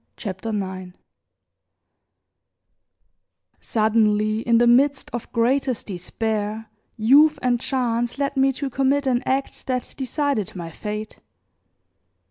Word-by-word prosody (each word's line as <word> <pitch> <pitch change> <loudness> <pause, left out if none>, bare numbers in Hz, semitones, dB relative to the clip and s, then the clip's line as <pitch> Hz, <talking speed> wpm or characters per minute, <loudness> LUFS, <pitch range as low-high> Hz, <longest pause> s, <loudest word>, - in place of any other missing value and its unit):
CHAPTER 195 +1 -5
IX 190 -3 -4 2.7
SUDDENLY, 215 -1 +1
in 235 0 +2
the 240 - +4
midst 265 +3 +3
of 240 -1 -6
greatest 255 +1 +1
despair 215 +3 -3 0.3
youth 285 +8 +5
and 245 -1 +2
chance 240 -2 -1
led 280 0 -1
me 270 0 +3
to 270 +1 -4
commit 275 +2 +1
an 250 -2 +1
act 270 +1 -2
that 250 -2 -2
decided 270 - -2
my 170 -2 -6
fate. 210 +4 -6
235 Hz, 105 wpm, -23 LUFS, 215-265 Hz, 2.7 s, youth